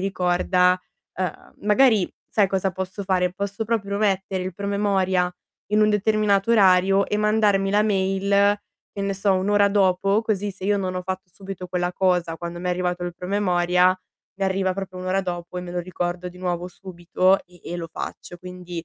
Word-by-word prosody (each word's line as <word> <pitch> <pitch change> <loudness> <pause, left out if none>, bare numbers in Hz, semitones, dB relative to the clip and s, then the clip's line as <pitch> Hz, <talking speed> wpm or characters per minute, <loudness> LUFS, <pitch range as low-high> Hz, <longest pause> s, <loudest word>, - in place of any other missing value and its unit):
ricorda, 180 -1 +2 0.4
ehm, 185 -3 -5
magari 210 -1 +3 0.2
sai 205 -2 +3
cosa 190 0 -1
posso 190 +2 -5
fare? 180 -2 +1
Posso 200 +3 -4
proprio 200 -3 -1
mettere 195 -2 0
il 185 +1 -4
promemoria 195 -2 0 0.4
in 210 - +4
un 215 - +5
determinato 210 0 +2
orario, 195 -2 +5
e 210 - -1
mandarmi 210 -2 +2
la 205 +1 +3
mail, 200 0 +2 0.3
che 200 - -6
ne 200 0 -1
so, 195 +1 +1
1 190 +1 0
ora 205 0 +4
dopo, 195 +1 +2
così 205 -2 -1
se 190 - -9
io 205 +1 +2
non 185 -2 -2
ho 185 - -2
fatto 185 0 -5
subito 190 -1 -8
quella 175 0 -1
cosa, 180 -3 +1
quando 170 0 -6
m'è 180 +1 -3
arrivato 180 0 -1
il 175 -1 -5
promemoria, 180 -1 +2 0.4
mi 195 - 0
arriva 190 -1 0
proprio 190 -1 -6
1 185 - -6
ora 190 +1 +1
dopo, 175 -1 -5
e 180 - -3
me 180 - -7
lo 175 - -3
ricordo 175 0 -3
di 180 - -14
nuovo 180 -1 -3
subito 185 +1 0
e 175 -1 -20
e 175 - -4
lo 165 -1 -5
faccio. 175 - -7
Quindi, 180 -1 -8
190 Hz, 185 wpm, -23 LUFS, 180-200 Hz, 0.4 s, un